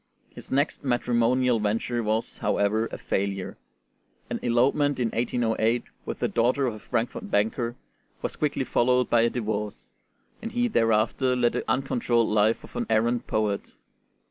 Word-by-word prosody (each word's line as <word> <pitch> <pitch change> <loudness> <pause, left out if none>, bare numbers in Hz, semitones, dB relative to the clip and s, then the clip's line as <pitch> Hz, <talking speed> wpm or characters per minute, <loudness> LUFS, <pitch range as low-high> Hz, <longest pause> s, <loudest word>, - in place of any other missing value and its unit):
His - - -11
next 140 +3 0
matrimonial 120 -1 +2
venture 115 +3 -1
was, 110 +1 -2
however, 110 +3 +1
a - - -7
failure: 95 -1 -3 0.7
an - - -2
elopement 130 +4 +2
in 120 -2 +1
1808 115 0 0 0.2
with - - -3
the - - 0
daughter 125 +4 +1
of 120 - -1
a 110 - -9
Frankfort 120 +2 -3
banker 115 +3 0 0.5
was - - -3
quickly 145 -3 0
followed 125 0 +2
by 120 - +5
a 115 - +3
divorce, 105 -3 -4 0.5
and 230 0 -6
he 245 0 +2
thereafter 115 - +2
led 120 -1 +2
the - - -3
uncontrolled 120 -3 +1
life 105 +1 +2
of - - -14
an - - -2
errant 115 +2 +1
poet. 105 -2 -1
120 Hz, 150 wpm, -26 LUFS, 110-125 Hz, 0.7 s, by